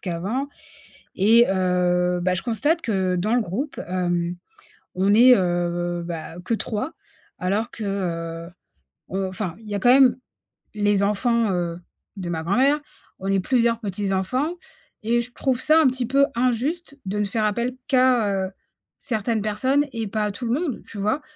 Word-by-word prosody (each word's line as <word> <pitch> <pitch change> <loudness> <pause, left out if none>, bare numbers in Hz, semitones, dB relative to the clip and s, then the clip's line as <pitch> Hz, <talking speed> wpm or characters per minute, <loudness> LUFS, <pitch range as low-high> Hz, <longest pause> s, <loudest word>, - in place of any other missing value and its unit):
qu'avant 200 +11 -3 0.7
et 230 +5 +5
heu, 180 -1 +1
bah, 185 +1 +1
je - - -2
constate 290 +8 +1
que 190 - 0
dans 210 +6 0
le - - +4
groupe, 225 - -4
hem, 175 -1 -1 0.6
on 195 +3 +3
est, 250 +3 +8
heu, 175 -1 -1
bah, 165 -1 -6
que 230 - -2
3,, 220 +6 -3 0.5
alors 205 +6 -1
que, 220 - -7 0.6
heu - - -12 0.6
on 190 +1 -2
enfin, 185 -3 -4
il 215 - -13
y - - -3
a - - -3
quand 245 +5 +6
même 260 -2 +6 0.6
les 205 -1 +2
enfants, 230 +2 +1
heu, 175 -1 -2 0.4
de 185 -3 -5
ma 160 -1 -2
grand-mère. 265 - +3 0.4
On 195 - -4
est 195 - +2
plusieurs 235 +1 +1
petits 200 -2 -2
enfants 255 - 0 0.5
et 235 +2 +2
je 245 +1 -8
trouve 260 -2 -1
ça 315 +1 +5
un 315 - +4
petit 255 -2 -1
peu 275 +2 +4
injuste 275 +6 -1
de 205 +2 -2
ne - - +2
faire 215 +2 -1
appel 235 +4 0
qu'à, 235 -8 +3
heu, - - -8 0.5
certaines 225 -2 -1
personnes 260 +8 +1
et 225 -1 -2
pas 210 +1 -1
à 210 - -1
tout 240 +3 -6
le 230 - 0
monde, 305 -9 -3
tu 205 - -8
vois? 215 +9 0
215 Hz, 175 wpm, -23 LUFS, 185-250 Hz, 0.7 s, est